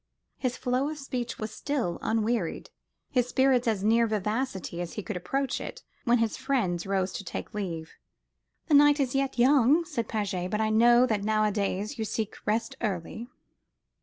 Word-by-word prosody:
His 255 Hz, -2 st, -1 dB
flow 255 Hz, +3 st, 0 dB
of 310 Hz, -, -5 dB
speech 255 Hz, -4 st, -4 dB
was 215 Hz, 0 st, -5 dB
still 250 Hz, -10 st, -2 dB
unwearied, 220 Hz, -5 st, -1 dB, 0.4 s
his 250 Hz, -2 st, +2 dB
spirits 260 Hz, -1 st, +3 dB
as 210 Hz, -4 st, 0 dB
near 230 Hz, +2 st, +4 dB
vivacity 210 Hz, -3 st, -2 dB
as 175 Hz, -, -6 dB
they 210 Hz, -, -4 dB
could 215 Hz, -, -5 dB
approach 270 Hz, +10 st, -2 dB
it, -, -, -7 dB, 0.2 s
when 240 Hz, 0 st, +4 dB
his 230 Hz, -2 st, 0 dB
friends 230 Hz, -11 st, -1 dB
rose 190 Hz, -1 st, 0 dB
to -, -, -5 dB
take 195 Hz, -, -6 dB
leave. 170 Hz, -6 st, -4 dB, 0.7 s
"The 315 Hz, -, -1 dB
night 290 Hz, +1 st, +6 dB
is 265 Hz, -3 st, 0 dB
yet 270 Hz, -1 st, 0 dB
young," 275 Hz, +5 st, +5 dB
said 235 Hz, -8 st, -3 dB
Paget, 195 Hz, -4 st, -2 dB
"but 210 Hz, -, -1 dB
I 215 Hz, 0 st, +1 dB
know 240 Hz, +3 st, +6 dB
that 215 Hz, -5 st, -1 dB
nowadays 215 Hz, +1 st, 0 dB
you 220 Hz, -, -1 dB
seek 215 Hz, 0 st, -3 dB
rest 225 Hz, +2 st, 0 dB
early." 215 Hz, +3 st, -3 dB
225 Hz, 170 wpm, -28 LUFS, 205-255 Hz, 0.7 s, night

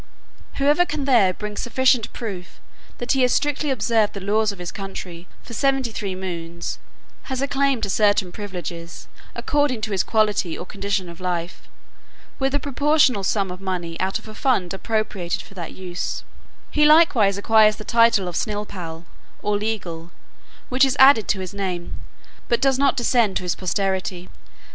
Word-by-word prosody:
Whoever 290 Hz, +5 st, +3 dB
can 300 Hz, -5 st, -3 dB
there 235 Hz, -9 st, +5 dB
bring 210 Hz, +3 st, -6 dB
sufficient 245 Hz, 0 st, +2 dB
proof, 195 Hz, -7 st, -7 dB, 0.4 s
that 240 Hz, -, -2 dB
he 270 Hz, -, +2 dB
has 250 Hz, -1 st, +4 dB
strictly 295 Hz, +1 st, 0 dB
observed 225 Hz, -4 st, +1 dB
the 200 Hz, -, -5 dB
laws 210 Hz, +2 st, +1 dB
of 200 Hz, -, -11 dB
his 175 Hz, -1 st, -6 dB
country 185 Hz, -3 st, -7 dB, 0.2 s
for 235 Hz, -, -10 dB
seventy 270 Hz, 0 st, +1 dB
three 200 Hz, -3 st, -4 dB
moons, 170 Hz, -2 st, -5 dB, 0.5 s
has 260 Hz, -1 st, -2 dB
a 275 Hz, -, 0 dB
claim 275 Hz, -2 st, +1 dB
to 205 Hz, -, -1 dB
certain 205 Hz, -3 st, +2 dB
privileges, 175 Hz, -4 st, -7 dB, 0.3 s
according 290 Hz, -6 st, 0 dB
to 215 Hz, -, -3 dB
his 195 Hz, -, +2 dB
quality 210 Hz, -6 st, +1 dB
or -, -, -7 dB
condition 200 Hz, -1 st, -2 dB
of 170 Hz, -1 st, -11 dB
life, 175 Hz, -1 st, -4 dB, 0.7 s
with 270 Hz, +1 st, +1 dB
a -, -, +2 dB
proportionable 285 Hz, -5 st, +2 dB
sum 195 Hz, -1 st, 0 dB
of 180 Hz, +1 st, -8 dB
money 180 Hz, -3 st, -3 dB
out 190 Hz, +1 st, 0 dB
of -, -, -14 dB
a 215 Hz, -, -9 dB
fund 215 Hz, -8 st, 0 dB
appropriated 205 Hz, -3 st, -2 dB
for -, -, -16 dB
that 175 Hz, -4 st, -7 dB
use: 180 Hz, -1 st, -4 dB, 0.5 s
he 300 Hz, -, +2 dB
likewise 300 Hz, -, +5 dB
acquires 215 Hz, +1 st, +5 dB
the 215 Hz, -, -9 dB
title 230 Hz, -5 st, +4 dB
of 175 Hz, -, -5 dB
snilpall, 185 Hz, -7 st, -4 dB, 0.4 s
or 210 Hz, -, +1 dB
legal, 185 Hz, -6 st, -4 dB, 0.6 s
which 260 Hz, +2 st, +3 dB
is 270 Hz, +1 st, +3 dB
added 265 Hz, -6 st, +7 dB
to 195 Hz, -, 0 dB
his 185 Hz, 0 st, -6 dB
name, 185 Hz, -3 st, -4 dB, 0.5 s
but 235 Hz, -, +2 dB
does 270 Hz, -1 st, +2 dB
not 280 Hz, 0 st, +3 dB
descend 235 Hz, -5 st, +2 dB
to -, -, -5 dB
his 180 Hz, -, 0 dB
posterity. 185 Hz, -1 st, -2 dB
210 Hz, 170 wpm, -22 LUFS, 185-250 Hz, 0.7 s, added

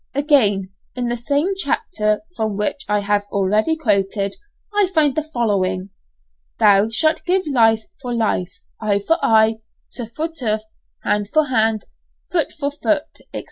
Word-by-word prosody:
Again, 215 Hz, -, +2 dB, 0.2 s
in 245 Hz, -1 st, -2 dB
the 240 Hz, -, 0 dB
same 285 Hz, +10 st, 0 dB
chapter 215 Hz, -, 0 dB
from 215 Hz, -2 st, -2 dB
which 210 Hz, +6 st, -1 dB
I 210 Hz, 0 st, +2 dB
have 205 Hz, 0 st, +1 dB
already 210 Hz, +10 st, +2 dB
quoted, 200 Hz, -6 st, 0 dB, 0.4 s
I 410 Hz, -2 st, +3 dB
find 300 Hz, -3 st, +4 dB
the 310 Hz, -, 0 dB
following, 200 Hz, -10 st, -1 dB, 0.7 s
"Thou 205 Hz, +1 st, +5 dB
shalt 310 Hz, +8 st, +1 dB
give 370 Hz, +1 st, +1 dB
life 225 Hz, -6 st, +3 dB, 0.2 s
for 250 Hz, -2 st, -5 dB
life, 215 Hz, -6 st, 0 dB, 0.3 s
eye 210 Hz, -2 st, +2 dB
for 330 Hz, +1 st, +1 dB
eye, 220 Hz, 0 st, +4 dB, 0.3 s
tooth 235 Hz, -2 st, -6 dB
for 315 Hz, +2 st, -1 dB
tooth, 225 Hz, -10 st, -2 dB, 0.4 s
hand 205 Hz, -1 st, 0 dB
for 310 Hz, -1 st, +2 dB
hand, 220 Hz, -3 st, +1 dB, 0.5 s
foot 335 Hz, -5 st, +1 dB
for 285 Hz, -1 st, -3 dB
foot, 295 Hz, +1 st, -1 dB
&c. -, -, -4 dB
225 Hz, 150 wpm, -20 LUFS, 210-295 Hz, 0.7 s, Thou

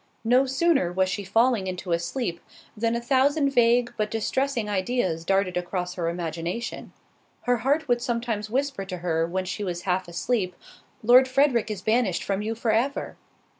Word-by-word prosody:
No 250 Hz, +4 st, +4 dB
sooner 270 Hz, -, +2 dB
was 185 Hz, +1 st, +1 dB
she 200 Hz, +2 st, -3 dB
falling 225 Hz, +1 st, +2 dB
into 180 Hz, -1 st, -5 dB
a 170 Hz, -, +2 dB
sleep, 170 Hz, 0 st, -3 dB, 0.4 s
than 230 Hz, +1 st, 0 dB
a -, -, 0 dB
thousand 275 Hz, +3 st, +2 dB
vague, 240 Hz, -1 st, +3 dB
but 215 Hz, 0 st, 0 dB
distressing, 235 Hz, +2 st, -1 dB
ideas 190 Hz, -4 st, -1 dB
darted 195 Hz, 0 st, +1 dB
across 180 Hz, 0 st, -3 dB
her 170 Hz, -2 st, -2 dB
imagination. 170 Hz, +6 st, -4 dB, 0.5 s
Her 245 Hz, 0 st, +1 dB
heart 280 Hz, +6 st, 0 dB
would 240 Hz, -1 st, +2 dB
sometimes 235 Hz, -3 st, -2 dB
whisper 270 Hz, -3 st, -1 dB
to 185 Hz, -1 st, -6 dB
her 165 Hz, -2 st, 0 dB
when 185 Hz, +2 st, -2 dB
she 185 Hz, +3 st, -4 dB
was 175 Hz, -2 st, -4 dB
half 185 Hz, -1 st, 0 dB
asleep, 180 Hz, +1 st, -1 dB, 0.5 s
"Lord 250 Hz, +3 st, +7 dB
Frederick 255 Hz, -4 st, +2 dB
is 200 Hz, -3 st, -5 dB
banished 220 Hz, -5 st, +1 dB
from 195 Hz, 0 st, -1 dB
you 220 Hz, +2 st, -2 dB
for 225 Hz, 0 st, 0 dB
ever." 245 Hz, +6 st, -1 dB
215 Hz, 170 wpm, -25 LUFS, 180-245 Hz, 0.5 s, Lord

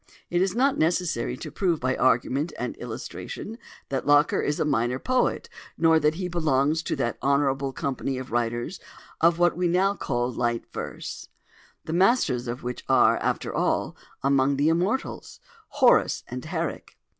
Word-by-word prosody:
It 175 Hz, 0 st, +2 dB
is 190 Hz, +1 st, +1 dB
not 270 Hz, +3 st, +2 dB
necessary 160 Hz, -7 st, 0 dB
to 155 Hz, -, -7 dB
prove 170 Hz, 0 st, 0 dB
by 130 Hz, 0 st, 0 dB
argument 130 Hz, +5 st, +1 dB
and -, -, -4 dB
illustration 225 Hz, +3 st, -7 dB, 0.3 s
that 135 Hz, 0 st, -3 dB
Locker 145 Hz, +2 st, +4 dB
is 150 Hz, -, -1 dB
a -, -, +1 dB
minor 125 Hz, -3 st, +1 dB
poet, 255 Hz, -, 0 dB, 0.3 s
nor 160 Hz, -1 st, +4 dB
that 150 Hz, +1 st, +2 dB
he 180 Hz, +1 st, -3 dB
belongs 155 Hz, -3 st, +1 dB
to -, -, -2 dB
that 120 Hz, -, -2 dB
honourable 140 Hz, -1 st, +1 dB
company 135 Hz, 0 st, -3 dB
of 130 Hz, 0 st, -7 dB
writers 120 Hz, +8 st, -2 dB, 0.4 s
of 165 Hz, +1 st, +4 dB
what 175 Hz, -1 st, +3 dB
we 180 Hz, +1 st, +1 dB
now 185 Hz, +3 st, +2 dB
call 120 Hz, -9 st, -2 dB
"light 120 Hz, -1 st, -1 dB
verse"—the 160 Hz, -, -9 dB
masters 180 Hz, -, +2 dB
of 120 Hz, +2 st, -5 dB
which 125 Hz, 0 st, -5 dB
are, -, -, +5 dB
after -, -, -2 dB
all, -, -, 0 dB, 0.3 s
among 140 Hz, 0 st, +3 dB
the 145 Hz, +3 st, +2 dB
immortals—Horace 215 Hz, -, 0 dB
and -, -, -6 dB
Herrick. -, -, -4 dB
150 Hz, 155 wpm, -25 LUFS, 130-175 Hz, 0.4 s, are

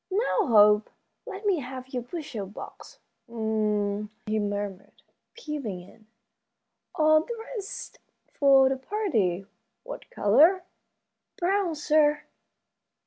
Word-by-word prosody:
"Now, 400 Hz, -1 st, +1 dB
Hope, 210 Hz, -2 st, +5 dB, 0.4 s
let 410 Hz, -2 st, -7 dB
me 390 Hz, -5 st, +2 dB
have 255 Hz, -1 st, -8 dB
your 255 Hz, -2 st, -3 dB
bushel 240 Hz, -, -6 dB
box. 205 Hz, -, -11 dB, 0.3 s
H'm," 210 Hz, -2 st, -1 dB, 0.2 s
he 215 Hz, 0 st, 0 dB
murmured, 205 Hz, -1 st, -5 dB, 0.3 s
peeping 285 Hz, -, -5 dB
in, 215 Hz, +4 st, -18 dB, 0.9 s
"all 310 Hz, -2 st, +5 dB
dressed 450 Hz, +1 st, -7 dB, 0.3 s
for 275 Hz, -2 st, +5 dB
the 265 Hz, 0 st, 0 dB
party. 260 Hz, -, -1 dB, 0.4 s
What -, -, -9 dB
color?" 340 Hz, -, +4 dB, 0.7 s
"Brown, 365 Hz, -1 st, 0 dB
sir." 300 Hz, 0 st, +2 dB
265 Hz, 100 wpm, -27 LUFS, 210-345 Hz, 0.9 s, Hope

